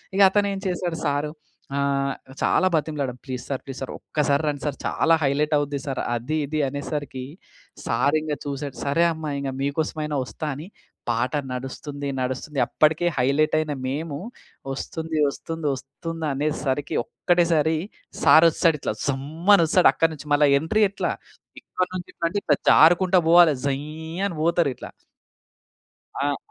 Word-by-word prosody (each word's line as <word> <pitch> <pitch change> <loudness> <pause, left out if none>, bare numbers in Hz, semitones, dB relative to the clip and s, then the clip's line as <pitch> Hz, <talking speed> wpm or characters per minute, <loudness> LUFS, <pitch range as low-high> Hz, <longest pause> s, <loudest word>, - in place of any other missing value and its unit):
ఇగ 200 - +3
అతనేం 200 -1 +1
చేసాడు 175 -2 -2
సారు 145 +1 -1 0.5
ఆహ్, 140 -1 0 0.3
చాలా 185 - +3
బతిమలాడం. 145 -5 -2
ప్లీస్ 130 -2 -5
సార్ 135 - -2
ప్లీజ్ 135 -1 -7
సార్ 135 - -4
ఒక్కసారి 145 -1 0
రండి 145 -1 -2
సార్ 145 -2 -2
చాలా 165 - +2
హైలైట్ 150 +3 +1
అవుద్ది 145 -1 -2
సార్. 135 - -2
అది 130 +7 -2
ఇది 155 +1 -2
అనేసరికి. 140 -2 -5 0.6
సార్ 145 +2 +2
ఇంగ 155 -1 -3
చూసాడు. 140 -1 -4
సరే 140 +4 +2
అమ్మా 155 -1 -5
ఇంగ 140 -1 -3
మీకోసమైనా 150 +1 -2
వస్తా 155 +4 -6
అని 155 +6 -8 0.4
పాట 120 +4 0 0.2
నడుస్తుంది 140 +2 -5
నడుస్తుంది. 130 +3 -3
అప్పటికే 155 +3 +2
హైలైట్ 140 +5 +2
అయిన 155 -2 -2
మేము. 145 +2 -3 0.6
వస్తుంది 160 +3 -4
వస్తుంది 160 +2 -5
వస్తుందనే 150 +2 -4 0.2
సరికి 140 +1 -1
ఒక్కటేసారి 165 -2 +1 0.5
సార్ 160 +1 +7
వస్తడిట్లా 155 - +1
జుమ్ 135 -1 -1 0.3
అని 170 - +4
ఒస్తడు 180 +3 +5
అక్కడి 165 0 +2
నుంచి. 150 -1 -11
మళ్ళా 145 0 +5
ఎంట్రీ 215 +8 +1
ఎట్లా? 200 - -2 0.5
ఇక్కన్నుంచి 185 -1 -4
ఇట్లంటే 170 +4 -2
ఇట్లా 145 - +3
జారుకుంటా 175 +3 +6
పోవాలె 170 -3 +7
జయ్ 140 +1 -1 0.4
అని 175 - -6
పోతరు 170 -2 +2
ఇట్లా. - - -9 1.3
ఆహ్, 145 -1 0
150 Hz, 140 wpm, -24 LUFS, 140-165 Hz, 1.3 s, సార్